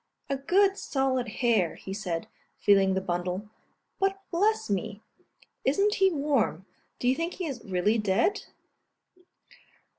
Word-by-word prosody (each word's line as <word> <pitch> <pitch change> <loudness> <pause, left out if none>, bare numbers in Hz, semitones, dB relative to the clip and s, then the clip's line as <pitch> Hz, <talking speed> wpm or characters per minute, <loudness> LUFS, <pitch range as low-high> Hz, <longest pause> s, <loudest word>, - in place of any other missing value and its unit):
"A - - +2
good 385 +8 +2
solid 265 -3 0
hare," 220 -6 +1
he 190 - -7
said, 180 -5 -3 0.3
feeling 195 -2 +4
the 190 - 0
bundle; 180 +3 -3 0.5
"but 390 0 +1
bless 415 +6 +2
me, 205 +1 -3 0.6
isn't 395 +10 +2
he 385 -2 +3
warm? 275 - 0 0.3
Do 245 - -2
you 255 - +5
think 335 +5 -3
he 365 - -4
is 275 -5 -5
really 195 +4 +1
dead?" 215 - +1
240 Hz, 130 wpm, -28 LUFS, -, 0.6 s, you